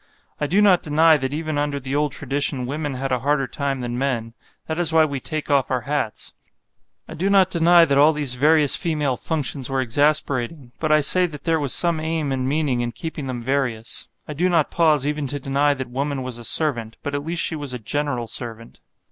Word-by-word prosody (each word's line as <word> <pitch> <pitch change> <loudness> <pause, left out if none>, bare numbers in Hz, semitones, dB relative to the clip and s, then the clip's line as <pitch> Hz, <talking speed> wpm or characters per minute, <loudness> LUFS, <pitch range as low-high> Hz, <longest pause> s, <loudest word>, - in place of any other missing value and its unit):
I 150 - -1
do 195 +7 +3
not 190 -4 +5
deny 160 +2 +4
that 135 -2 -3
even 155 0 -3
under 145 -1 -1
the 135 +1 -4
old 150 -1 +1
tradition 140 -1 -2
women 145 +1 -4
had 135 +1 -4
a 125 - +1
harder 140 +2 +1
time 135 0 -3
than 120 0 -4
men; 120 -4 -2 0.3
that 160 +1 -4
is 170 -2 +2
why 160 -1 +5
we 140 -3 -4
take 155 +1 -3
off 140 -2 +2
our 130 -2 -1
hats. 130 -4 -3 0.7
I - - -9
do 190 +5 -1
not 190 -2 +4
deny 170 0 +5
that 140 -3 +2
all 150 +2 +6
these 150 -4 0
various 150 +2 +4
female 150 -6 -1
functions 140 -3 -3
were 135 0 -1
exasperating; 135 0 0
but 155 -1 -1
I 155 0 +5
say 180 +5 +4
that 150 -4 -10
there 165 -1 +1
was 140 -3 -2
some 170 +1 +3
aim 160 -2 -2
and 130 -1 -1
meaning 140 -4 0
in 120 0 -3
keeping 150 +2 -6
them 125 -2 -5
various. 125 -4 -2 0.2
I 150 - -5
do 175 +5 +1
not 165 -4 +1
pause 155 -5 +2
even 150 -1 -2
to 145 +2 -4
deny 140 +2 +1
that 130 -2 -6
woman 140 +1 -2
was 125 -2 -6
a - - -9
servant; 115 -4 -1
but 145 - -4
at 145 0 -2
least 165 +2 -1
she - - 0
was 145 -3 -4
a 125 - -3
general 125 +1 -2
servant. 115 0 -6
145 Hz, 225 wpm, -22 LUFS, 130-155 Hz, 0.7 s, all